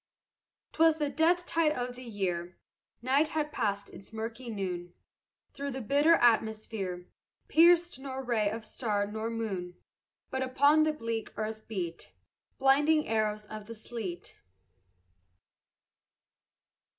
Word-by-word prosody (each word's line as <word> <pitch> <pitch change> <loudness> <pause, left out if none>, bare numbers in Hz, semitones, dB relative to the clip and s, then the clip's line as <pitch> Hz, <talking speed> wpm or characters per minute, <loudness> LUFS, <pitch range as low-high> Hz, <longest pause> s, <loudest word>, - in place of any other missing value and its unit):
'Twas 325 0 +5
the 295 -2 -1
death 345 +3 +2
tide 325 -3 +2
of 245 -1 -3
the 250 - -10
year; 180 -6 -3 0.5
Night 275 +5 +3
had 300 -1 -2
passed 205 -6 -2
its 195 - -12
murky 225 +2 -5
noon; 180 -4 -4 0.6
Through 280 0 -4
the 265 -1 -4
bitter 290 +8 +4
atmosphere 220 - +1 0.4
Pierced 345 -2 +5
nor 265 -1 -5
ray 225 -5 +1
of 220 +1 -5
star 210 -3 -1
nor 220 +2 -4
moon; 195 -6 -4 0.6
But 265 - -1
upon 285 +4 +4
the 310 - +1
bleak 230 -6 -4
earth 220 0 -4
beat 180 -6 -5 0.4
Blinding 295 +3 +4
arrows 215 -1 0
of 215 0 -9
the 230 - -7
sleet. 215 -6 -7
230 Hz, 125 wpm, -30 LUFS, 210-280 Hz, 0.6 s, Twas